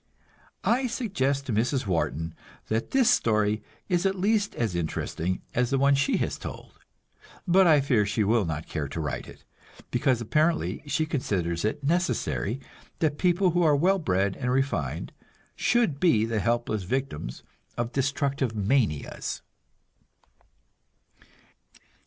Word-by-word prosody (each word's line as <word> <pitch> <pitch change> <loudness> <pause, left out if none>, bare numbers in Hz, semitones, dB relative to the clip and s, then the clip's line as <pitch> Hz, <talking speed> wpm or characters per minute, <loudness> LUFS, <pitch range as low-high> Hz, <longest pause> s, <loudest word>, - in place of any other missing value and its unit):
I 255 +2 +2
suggest 140 - -1
to 125 - -2
Mrs. 125 +5 +1
Wharton 80 -3 -1 0.4
that 110 +1 -1
this 265 -3 +3
story 105 -1 +2 0.3
is 180 -2 +1
at 195 0 +1
least 205 +2 +1
as 115 -5 -1
interesting 85 +1 -2
as 125 0 +1
the 135 - +1
one 140 +1 +4
she 140 0 +2
has - - -2
told; - - -9 0.7
but 185 +1 +5
I 150 -3 +6
fear 125 -6 +2
she 105 +1 0
will 110 +2 +3
not 80 -3 -3
care 75 -3 -3
to 75 - -6
write 70 -5 -3
it, - - -14 0.5
because 125 0 +2
apparently 155 +8 +1
she 155 +2 +1
considers 90 - -1
it 140 +7 -1
necessary 150 - 0 0.4
that 150 -2 0
people 180 0 +3
who 175 +1 +1
are 155 -3 +5
well 185 +7 +3
bred 95 - 0
and 125 - -2
refined 125 - -1 0.4
should 235 - +2
be 120 -12 +4
the 115 -1 -1
helpless 115 -1 0
victims 95 - -3 0.3
of 120 0 -2
destructive 140 -3 0
manias. 105 - -1
130 Hz, 140 wpm, -27 LUFS, 105-155 Hz, 0.7 s, I